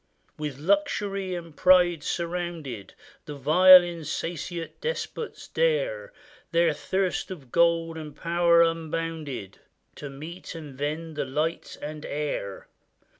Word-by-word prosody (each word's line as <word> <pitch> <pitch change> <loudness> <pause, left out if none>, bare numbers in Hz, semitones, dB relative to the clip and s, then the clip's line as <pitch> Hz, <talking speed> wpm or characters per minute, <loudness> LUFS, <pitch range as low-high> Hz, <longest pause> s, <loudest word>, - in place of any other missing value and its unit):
With 150 -3 -5
luxury 195 +2 0
and 170 -3 -8
pride 180 -3 +5
surrounded, 170 - -4 0.3
The 150 - -7
vile 180 +6 +8
insatiate 170 0 -5
despots 470 -1 -4
dare, - - 0 0.4
Their 170 -2 +3
thirst 185 +4 -1
of 145 -10 -9
gold 165 -1 +2
and 150 -2 -8
power 170 0 +4
unbounded, 160 - -3 0.4
To 145 - -7
mete 155 +7 -9
and 150 -4 -9
vend 155 +3 -4
the 145 - -1
light 150 +5 -2
and 150 0 -6
air 145 -10 -4
165 Hz, 115 wpm, -26 LUFS, 150-180 Hz, 0.4 s, vile